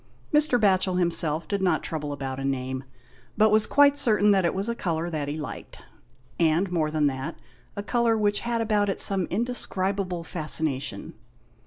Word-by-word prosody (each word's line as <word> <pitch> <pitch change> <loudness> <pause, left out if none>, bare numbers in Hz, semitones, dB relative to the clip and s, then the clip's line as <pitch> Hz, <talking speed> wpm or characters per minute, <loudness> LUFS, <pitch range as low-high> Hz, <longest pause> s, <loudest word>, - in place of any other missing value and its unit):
Mr. 300 -5 +3
Batchel 190 -3 +2
himself 165 -3 +2
did 200 +2 -2
not 180 -4 +1
trouble 150 -2 -4
about 135 -2 -5
a - - -5
name, 130 -1 -3 0.5
but 215 0 +4
was 215 0 +3
quite 285 0 +4
certain 210 -5 +3
that 190 -3 +2
it 170 - 0
was 195 +3 -2
a 235 - -1
colour 170 -6 -3
that 150 -3 -3
he 145 +2 -4
liked; 150 -3 -9 0.5
and 170 +3 +1
more 160 -3 0
than 155 -1 0
that, 135 +3 -3 0.4
a 205 - -5
colour 235 0 +1
which 205 -1 0
had 235 -1 -2
about 210 -2 +1
it 195 - -2
some 195 -3 +4
indescribable 195 -5 -2
fascination. 155 -4 -2
180 Hz, 175 wpm, -25 LUFS, 155-210 Hz, 0.5 s, but